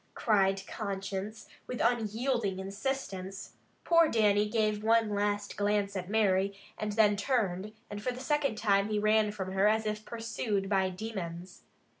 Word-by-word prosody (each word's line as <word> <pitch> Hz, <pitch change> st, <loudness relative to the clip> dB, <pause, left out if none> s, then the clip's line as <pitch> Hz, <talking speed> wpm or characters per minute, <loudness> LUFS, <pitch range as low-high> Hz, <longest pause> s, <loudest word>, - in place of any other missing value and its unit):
cried 195 Hz, -3 st, +2 dB
conscience, 200 Hz, +1 st, -5 dB, 0.2 s
with 250 Hz, -, -5 dB
unyielding 230 Hz, -2 st, 0 dB
insistence. 195 Hz, -1 st, -4 dB, 0.3 s
Poor 335 Hz, -2 st, +5 dB
Dannie 210 Hz, -2 st, +3 dB
gave 215 Hz, -1 st, 0 dB
one 225 Hz, -1 st, +3 dB
last 205 Hz, 0 st, -1 dB
glance 205 Hz, -1 st, 0 dB
at 185 Hz, -1 st, -4 dB
Mary, 200 Hz, -2 st, +2 dB, 0.2 s
and 210 Hz, -1 st, -3 dB
then 210 Hz, -1 st, +4 dB
turned, 205 Hz, -3 st, -1 dB, 0.2 s
and 205 Hz, 0 st, -6 dB
for 250 Hz, -, -1 dB
the 250 Hz, -, -7 dB
second 275 Hz, -3 st, 0 dB
time 200 Hz, -1 st, +2 dB
he 215 Hz, -, 0 dB
ran 215 Hz, 0 st, +3 dB
from 190 Hz, -3 st, -5 dB
her 195 Hz, +2 st, +3 dB
as 220 Hz, +1 st, +2 dB
if 215 Hz, 0 st, -2 dB
pursued 225 Hz, -4 st, -3 dB
by 190 Hz, -1 st, +2 dB
demons. 180 Hz, -3 st, -6 dB
210 Hz, 150 wpm, -30 LUFS, 195-220 Hz, 0.3 s, Poor